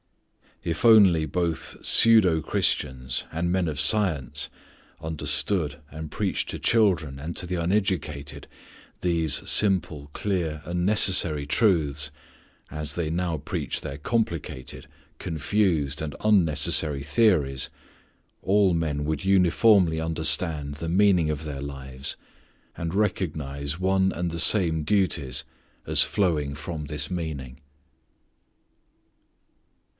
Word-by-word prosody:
If 85 +7 -3
only 100 -8 +6
both 85 +1 -3
pseudo 105 -8 +5
Christians 65 -4 0
and 85 +2 -2
men 90 -1 0
of 75 -3 -3
science 75 - +2 0.5
understood 75 0 -1
and 80 0 -7
preached 100 +1 -2
to - - -5
children 90 -12 +2
and 80 +4 -6
to 90 - -2
the 90 - -3
uneducated 90 -5 -2 0.5
these 85 -5 0
simple, 85 -8 +1
clear, 85 -7 -2
and 90 +1 -2
necessary 90 -7 +2
truths 75 - +1 0.6
as 75 -1 -3
they 85 -1 -3
now 85 0 -2
preach 75 - -4
their 70 - -6
complicated, 80 - -4 0.3
confused, 80 -3 -1
and 75 -2 -5
unnecessary 80 -7 +2
theories, 75 - +1 0.7
all 95 -1 +3
men 75 -3 -2
would 75 -1 -3
uniformly 95 -2 +3
understand 80 -2 0
the 80 +3 -5
meaning 90 -3 +3
of 75 +1 -5
their 70 -3 -6
lives 65 -1 -6 0.6
and 85 0 -5
recognize 75 -7 -2
one 95 0 +1
and 85 +1 -3
the 85 - -4
same 80 -5 +5
duties 85 -7 0 0.4
as - - +4
flowing 80 -8 0
from 75 +1 -6
this 75 0 -2
meaning. 75 -7 -6
80 Hz, 110 wpm, -25 LUFS, 75-95 Hz, 0.7 s, only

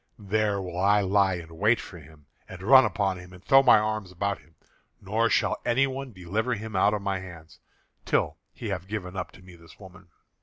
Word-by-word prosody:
There 105 -1 0
will 90 -2 -5
I 100 +2 +4
lie 95 -1 +2
in 80 -1 -10
wait 110 +4 +3
for 90 - -10
him, 75 -1 -17 0.2
and 95 0 -10
run 130 +5 +7
upon 95 -4 -1
him, 90 0 -13
and 90 0 -15
throw 135 0 +7
my 130 -4 +6
arms 105 -3 -2
about 100 +2 -2
him, 80 +1 -25 0.4
nor 110 +4 0
shall - - +1
anyone 135 +1 0
deliver 105 +6 -2
him 110 0 -7
out 100 +3 +3
of 100 - -5
my 100 -1 -1
hands, 85 -4 -12 0.4
till - - 0
he - - -7
have 95 - -4
given 95 -3 -5
up 95 - -4
to 95 - -16
me 90 -1 -14
this 85 0 -18
woman. 95 -1 -14
100 Hz, 205 wpm, -26 LUFS, 90-110 Hz, 0.4 s, run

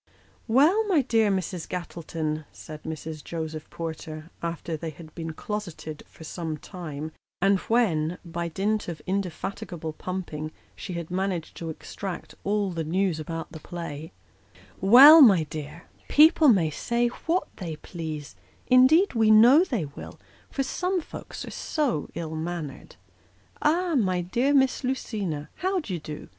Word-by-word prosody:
"Well, 300 - +5
my 340 -9 +3
dear 225 -4 +3
Mrs. 185 -3 -2
Gattleton," 160 -3 -4
said 155 -1 -10
Mrs. 155 -1 -6
Joseph 160 -2 -5
Porter, 160 -1 -6
after 170 -1 -3
they 160 +1 -5
had 155 0 -12
been 165 -2 -5
closeted 175 -5 -6
for - - -14
some 160 -1 -4
time, 155 -3 -7 0.3
and 195 +1 +3
when, 180 -8 +2
by 170 0 -3
dint 205 +5 -1
of 170 -3 -5
indefatigable 185 -2 -4
pumping, 155 -3 -5 0.2
she 185 - -6
had 170 -1 -5
managed 185 -3 -2
to 165 - -5
extract 180 +3 -6
all 200 -1 0
the 165 -2 -3
news 175 +1 0
about 165 +1 -5
the 160 - -8
play, 160 -2 -7 0.4
" 95 +2 -25
well, 290 +6 +11
my 195 - +7
dear, 155 +1 -7 0.2
people 315 +1 +6
may 180 - +4
say 235 +8 0 0.2
what 345 +3 +1
they 170 -5 -5
please; 155 -3 -7 0.3
indeed 265 +10 +5
we 225 -2 +3
know 240 +9 +8
they 240 - -2
will, 140 - -10 0.3
for 275 - -1
some 365 +7 -1
folks 320 - -8
are - - -8
so 275 - -1
ill 160 -1 -4
natured. 160 -3 -5 0.7
Ah, 340 +3 +2
my 185 - +2
dear 240 +10 +1
Miss 265 -1 +3
Lucina, 205 - -3
how 375 +1 0
d'ye 190 - -4
do 150 0 -8
175 Hz, 150 wpm, -26 LUFS, 160-230 Hz, 0.7 s, well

